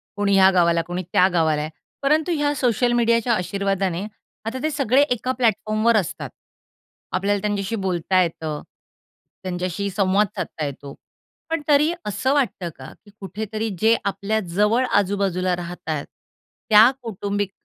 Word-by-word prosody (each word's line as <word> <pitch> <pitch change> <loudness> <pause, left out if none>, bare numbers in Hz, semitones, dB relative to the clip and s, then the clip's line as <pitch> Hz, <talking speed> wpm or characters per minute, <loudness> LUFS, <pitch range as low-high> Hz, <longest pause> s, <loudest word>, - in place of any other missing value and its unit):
कोणी 200 -1 +1
या 190 0 +7
गावाला, 170 -2 +3
कोणी 175 +1 -3
त्या 185 - +5
गावाला 160 -3 +2
आहे. 155 - -4 0.3
परंतु 305 +5 +2
ह्या 290 -1 +1
सोशल 245 -2 +1
मीडियाच्या 235 0 +2
आशीर्वादाने 195 -1 -1 0.4
आता 230 +4 -3
ते 310 - +1
सगळे 275 -2 +2
एका 250 +1 0
प्लॅटफॉर्मवर 225 -2 +1
असतात. 190 -6 -3 0.8
आपल्याला 200 +2 0
त्यांच्याशी 205 +1 -2
बोलता 185 +1 +1
येतं. 160 -3 -3 0.8
त्यांच्याशी 185 +2 -3
संवाद 200 +1 +3
साधता 155 - -4
येतो. 140 0 -7 0.6
पण 325 -1 -1
तरी 300 +2 +4
असं 210 +7 0
वाटतं 205 -11 0
का? 130 - -10
की 205 - -17
कुठेतरी 215 +3 -4
जे 225 +1 +5
आपल्या 200 +2 -1 0.2
जवळ 215 +5 +3
आजू-बाजूला 190 -2 0
राहतायत 170 -4 -5 0.6
त्या 220 +2 +8
कौटुंबिक 205 -3 -3
200 Hz, 135 wpm, -22 LUFS, 185-230 Hz, 0.8 s, त्या